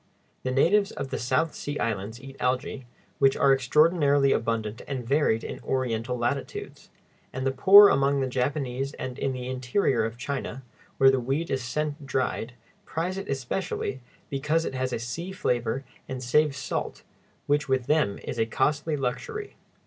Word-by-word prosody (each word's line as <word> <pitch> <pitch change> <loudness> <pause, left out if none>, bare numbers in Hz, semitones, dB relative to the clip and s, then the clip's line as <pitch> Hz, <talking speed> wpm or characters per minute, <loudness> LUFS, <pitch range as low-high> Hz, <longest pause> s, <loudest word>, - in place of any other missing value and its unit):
The 130 - -2
natives 195 +10 +3
of 140 -1 -5
the - - -2
South 130 +6 +1
Sea 145 0 -5
Islands 110 0 -3
eat 135 0 -11
algæ, 130 +1 -1 0.3
which 135 -1 +4
are 135 - +5
extraordinarily 145 +1 +3
abundant 115 -1 -1
and 130 -4 -4
varied 135 -5 +2
in - - -6
Oriental 125 -1 -1
latitudes; 120 +3 -4 0.4
and 130 +1 -4
the 135 - +2
poor 200 +9 +9
among 140 -3 +2
the 135 - +1
Japanese 135 +1 -2
and 130 +1 -6
in 135 - 0
the 125 -1 -5
interior 130 - +1
of 115 +1 -3
China, 135 0 -4 0.3
where 135 0 +7
the 135 - +1
weed 135 +7 -2
is 130 -2 -1
sent 145 +3 -3
dried, 130 -3 -1 0.3
prize 180 +4 -3
it 195 - -8
especially, 135 0 -3 0.3
because 150 +4 0
it - - -3
has 130 0 -2
a - - -1
sea 160 +11 -5
flavor 125 -7 -1 0.3
and 130 -1 -4
saves 140 +3 +2
salt, 130 - -4 0.4
which 145 -1 +1
with 130 -2 +1
them 150 -10 +2
is 120 - -5
a 115 - +2
costly 150 +5 0
luxury. 415 - -4
135 Hz, 165 wpm, -26 LUFS, 125-145 Hz, 0.4 s, poor